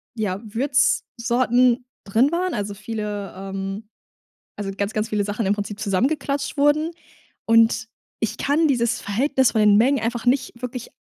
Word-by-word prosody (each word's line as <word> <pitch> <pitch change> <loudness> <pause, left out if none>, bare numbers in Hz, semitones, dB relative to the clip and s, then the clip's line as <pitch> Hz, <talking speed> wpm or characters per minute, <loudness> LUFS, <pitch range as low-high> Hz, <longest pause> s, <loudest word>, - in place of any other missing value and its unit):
ja, 205 -3 -2
Würzsorten 245 0 +1 0.2
drin 230 +9 +2
waren, 360 +1 -1
also 205 -1 -3
viele 210 -1 -5
ähm, 195 +2 -5 0.7
also 200 -1 -4
ganz, 200 +1 -2
ganz 215 +1 -1
viele 210 -2 0
Sachen 210 0 -2
im 200 - +3
Prinzip 205 0 -5
zusammengeklatscht 280 +8 -1
wurden. 295 +3 +3 0.6
Und 230 +1 +4 0.3
ich 225 - -1
kann 305 +3 +2
dieses 240 -3 +1
Verhältnis 260 +5 +1
von 220 - +2
den 210 -1 +6
Mengen 260 +5 +3
einfach 230 +1 -3
nicht 250 +2 +2
wirklich 250 -1 -5
230 Hz, 145 wpm, -22 LUFS, 205-265 Hz, 0.7 s, den